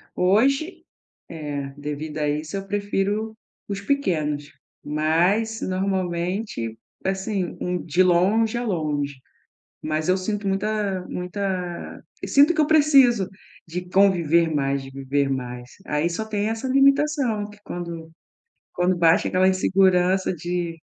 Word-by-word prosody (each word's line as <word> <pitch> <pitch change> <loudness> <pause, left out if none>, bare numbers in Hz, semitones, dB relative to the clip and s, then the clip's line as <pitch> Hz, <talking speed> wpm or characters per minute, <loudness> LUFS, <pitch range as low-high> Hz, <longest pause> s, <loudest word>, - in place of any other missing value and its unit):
Hoje, 270 - +2 0.4
eh, 145 -4 -5
devido 150 +1 -5
a 150 - 0
isso, 155 +5 -3
eu 195 0 -6
prefiro 205 +2 -1 0.3
os 200 -1 -4
pequenos, 155 - -1 0.3
mas 175 +9 +1
normalmente, 185 - -2 0.3
assim, 190 -1 -2
um 180 0 -1
de 175 +3 +2
longe 200 +6 +3
a 240 - -2
longe. 150 -7 -1 0.7
Mas 155 0 -2
eu 185 - +4
sinto 205 +2 -3
muita 195 -1 -1
muita 180 -1 -4 0.2
sinto 285 +4 +5
que 315 - +2
eu 300 - +2
preciso 275 -10 +5 0.4
de 180 +2 -5
conviver 170 -4 +3
mais, 140 -1 0
de 135 - -9
viver 135 +1 -1
mais. 125 -2 -5
Aí 150 +3 0
só 175 +6 -3
tem 210 -1 -1
essa 225 +3 -3
limitação 275 -5 +2
que 210 0 -15
quando 170 -2 -6 0.6
quando 180 0 +1
bate 170 -1 +4
aquela 185 +1 +3
insegurança 185 0 +2
de 175 0 -3
185 Hz, 125 wpm, -23 LUFS, 160-210 Hz, 0.7 s, sinto